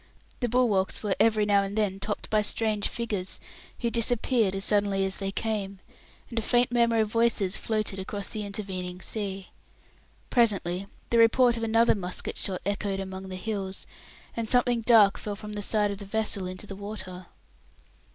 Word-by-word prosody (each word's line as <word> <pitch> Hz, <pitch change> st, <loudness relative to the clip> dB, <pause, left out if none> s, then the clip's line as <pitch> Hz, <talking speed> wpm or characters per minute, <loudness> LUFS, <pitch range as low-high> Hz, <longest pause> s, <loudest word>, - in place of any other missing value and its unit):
The 245 Hz, -, 0 dB
bulwarks 215 Hz, -7 st, +1 dB
were 205 Hz, -3 st, 0 dB
every 215 Hz, -1 st, +4 dB
now 200 Hz, -1 st, +4 dB
and 200 Hz, +2 st, -4 dB
then 200 Hz, -3 st, 0 dB
topped 205 Hz, +1 st, -4 dB
by 215 Hz, -1 st, +4 dB
strange 210 Hz, 0 st, +1 dB
figures, 210 Hz, -6 st, -3 dB, 0.4 s
who 235 Hz, -1 st, 0 dB
disappeared 230 Hz, -3 st, +2 dB
as 195 Hz, -, -1 dB
suddenly 200 Hz, -2 st, +2 dB
as 190 Hz, -, +2 dB
they 195 Hz, -1 st, -2 dB
came, 200 Hz, -2 st, -2 dB, 0.5 s
and 230 Hz, -, -1 dB
a -, -, -1 dB
faint 245 Hz, +2 st, +2 dB
murmur 235 Hz, -2 st, +3 dB
of 215 Hz, -1 st, -1 dB
voices 230 Hz, -4 st, +2 dB
floated 215 Hz, -3 st, -1 dB
across 200 Hz, +1 st, -4 dB
the 215 Hz, -2 st, -3 dB
intervening 190 Hz, -3 st, -5 dB
sea. 195 Hz, -1 st, -4 dB, 0.8 s
Presently 200 Hz, -6 st, +2 dB, 0.2 s
the 235 Hz, -, +4 dB
report 235 Hz, +1 st, +5 dB
of 230 Hz, -, -4 dB
another 230 Hz, +1 st, +4 dB
musket 180 Hz, -3 st, -3 dB
shot 185 Hz, -2 st, -2 dB
echoed 200 Hz, -1 st, -1 dB
among 190 Hz, 0 st, -6 dB
the 185 Hz, -, -5 dB
hills, 195 Hz, -1 st, -4 dB, 0.5 s
and 230 Hz, -1 st, -3 dB
something 245 Hz, -1 st, +3 dB
dark 220 Hz, -4 st, +5 dB
fell 205 Hz, -1 st, -4 dB
from 210 Hz, +1 st, -8 dB
the 205 Hz, -, -4 dB
side 210 Hz, 0 st, +1 dB
of 200 Hz, -, -6 dB
the 200 Hz, -, -7 dB
vessel 200 Hz, -2 st, -2 dB
into 185 Hz, +3 st, -6 dB
the 195 Hz, -, -7 dB
water. 190 Hz, -3 st, -7 dB
210 Hz, 175 wpm, -27 LUFS, 195-225 Hz, 0.8 s, report